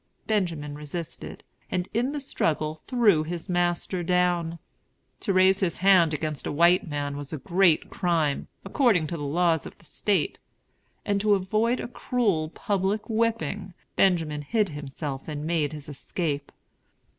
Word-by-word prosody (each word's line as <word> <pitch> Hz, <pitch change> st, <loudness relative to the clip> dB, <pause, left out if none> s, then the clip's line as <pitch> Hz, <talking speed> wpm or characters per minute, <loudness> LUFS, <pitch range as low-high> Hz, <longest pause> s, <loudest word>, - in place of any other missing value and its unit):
Benjamin 170 Hz, -9 st, -1 dB
resisted, 150 Hz, +3 st, -7 dB, 0.3 s
and 180 Hz, 0 st, -1 dB
in 245 Hz, +5 st, +1 dB
the 295 Hz, -, -3 dB
struggle 155 Hz, -, -1 dB
threw 220 Hz, -10 st, +4 dB
his 165 Hz, +2 st, -5 dB
master 175 Hz, 0 st, 0 dB
down. 175 Hz, -1 st, +1 dB, 0.6 s
To 200 Hz, -, -1 dB
raise 190 Hz, 0 st, +5 dB
his 185 Hz, -4 st, 0 dB
hand 185 Hz, -4 st, +5 dB
against 150 Hz, -1 st, -3 dB
a -, -, -2 dB
white 170 Hz, +5 st, +4 dB
man 145 Hz, -2 st, -3 dB
was 145 Hz, -1 st, -7 dB
a 155 Hz, -, -3 dB
great 170 Hz, +3 st, +2 dB
crime, 165 Hz, -5 st, 0 dB, 0.2 s
according 195 Hz, -, +3 dB
to 160 Hz, -, -4 dB
the -, -, -7 dB
laws 160 Hz, +1 st, +1 dB
of -, -, -13 dB
the -, -, -22 dB
State; -, -, 0 dB, 0.7 s
and 200 Hz, -1 st, +1 dB
to 210 Hz, -1 st, +4 dB
avoid 215 Hz, +6 st, +1 dB
a -, -, -4 dB
cruel, 210 Hz, -10 st, 0 dB
public 200 Hz, +4 st, -1 dB
whipping, 220 Hz, -4 st, -1 dB, 0.2 s
Benjamin 165 Hz, -6 st, +2 dB
hid 210 Hz, +6 st, +1 dB
himself 145 Hz, -2 st, -6 dB
and 150 Hz, -1 st, -4 dB
made 160 Hz, -3 st, 0 dB
his 150 Hz, -2 st, -8 dB
escape. 145 Hz, 0 st, -3 dB
175 Hz, 150 wpm, -26 LUFS, 155-195 Hz, 0.7 s, raise